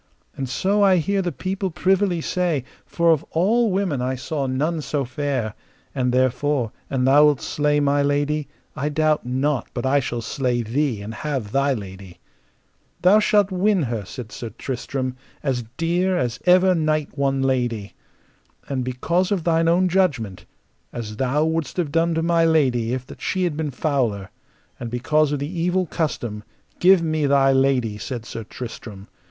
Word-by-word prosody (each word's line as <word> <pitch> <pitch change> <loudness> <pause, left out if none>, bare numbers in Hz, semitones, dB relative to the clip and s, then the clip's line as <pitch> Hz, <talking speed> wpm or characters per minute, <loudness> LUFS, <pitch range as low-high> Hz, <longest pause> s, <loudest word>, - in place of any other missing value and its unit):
And 135 -2 -4
so 200 +9 +1
I 195 -2 +5
hear 195 +4 +1
the 180 -2 -2
people 190 +4 -3
privily 185 0 +1
say, 170 -6 0 0.2
for 170 -1 +2
of 160 -1 +2
all 220 +8 +2
women 185 -9 0
I 130 +1 -1
saw 135 +2 -3
none 155 +5 -1
so 145 -2 -2
fair; 130 -5 -2 0.4
and 125 -2 0
therefore, 130 -1 +1 0.2
an 130 -2 0
thou 145 +3 +6
wilt 145 -3 +3
slay 150 0 0
my 145 0 +2
lady, 145 +1 0 0.3
I 150 - -1
doubt 155 -2 +1
not 130 +2 0
but 120 - -2
I 140 +2 +3
shall 120 -3 -3
slay 120 0 -1
thee 120 -2 -1
and 110 +2 -6
have 135 -7 -4
thy 140 +2 +2
lady. 95 -3 -9 0.8
Thou 195 +4 +6
shalt 205 -2 +3
win 190 -1 +2
her, 115 -5 -3
said 110 +2 -8
Sir 120 -3 -6
Tristram, 130 +3 -4 0.3
as 130 -5 -1
dear 175 +3 +1
as 120 -5 -2
ever 185 +1 +6
knight 155 -3 0
won 135 -1 0
lady. 120 -6 -1 0.7
And 130 -2 -2
because 170 +10 0
of 190 -5 0
thine 165 0 +2
own 180 +2 +3
judgment, 145 - 0 0.5
as 110 -3 -6
thou 135 +5 +1
wouldst 160 0 -2
have 165 -5 -1
done 165 +1 +2
to 160 - 0
my 170 0 +3
lady 130 -8 +2
if 130 0 -3
that - - -13
she 185 - -1
had 170 -4 0
been 155 -1 -2
fouler, 125 - -1 0.5
and 120 - -5
because 145 +5 +1
of 145 - 0
the 150 +6 -4
evil 180 +2 +1
custom, 120 - -3 0.4
give 185 -1 +6
me 155 -2 0
thy 135 -1 +4
lady, 130 -5 +1
said 120 -2 -5
Sir 115 - -6
Tristram. 110 -3 -9
145 Hz, 170 wpm, -22 LUFS, 125-165 Hz, 0.8 s, thou